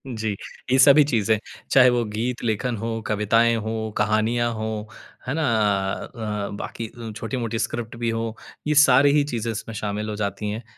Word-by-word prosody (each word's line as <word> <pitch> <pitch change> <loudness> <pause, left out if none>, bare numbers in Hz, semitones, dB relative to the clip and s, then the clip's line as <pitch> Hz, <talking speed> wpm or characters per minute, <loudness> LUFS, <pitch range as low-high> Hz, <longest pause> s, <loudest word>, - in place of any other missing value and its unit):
जी। 110 -1 -2 0.4
ये 130 - +5
सभी 140 +2 +8
चीज़ें 115 -6 +1 0.3
चाहे 130 -2 +7
वो 120 -1 +1
गीत 115 +4 -3
लेखन 115 +1 -1
हो, 115 +1 -3
कविताएँ 115 +2 +3
हों, 110 0 -3
कहानियाँ 115 +2 +1
हों 110 0 -3 0.5
है 130 - -1
ना? 160 +1 -1 0.6
अ, 105 -3 -4
बाकी 115 - -5
अ, 115 0 -8
छोटी-मोटी 115 0 -3
स्क्रिप्ट 115 0 -3
भी 115 - +2
हों। 115 0 -2 0.4
ये 150 - +2
सारी 135 +2 +5
ही 145 - +4
चीज़ें 115 0 -1
इसमें 115 +1 -6
शामिल 105 0 -3
हो 105 - -3
जाती 105 +1 -3
हैं। 110 +3 -4
115 Hz, 175 wpm, -23 LUFS, 110-120 Hz, 0.6 s, सभी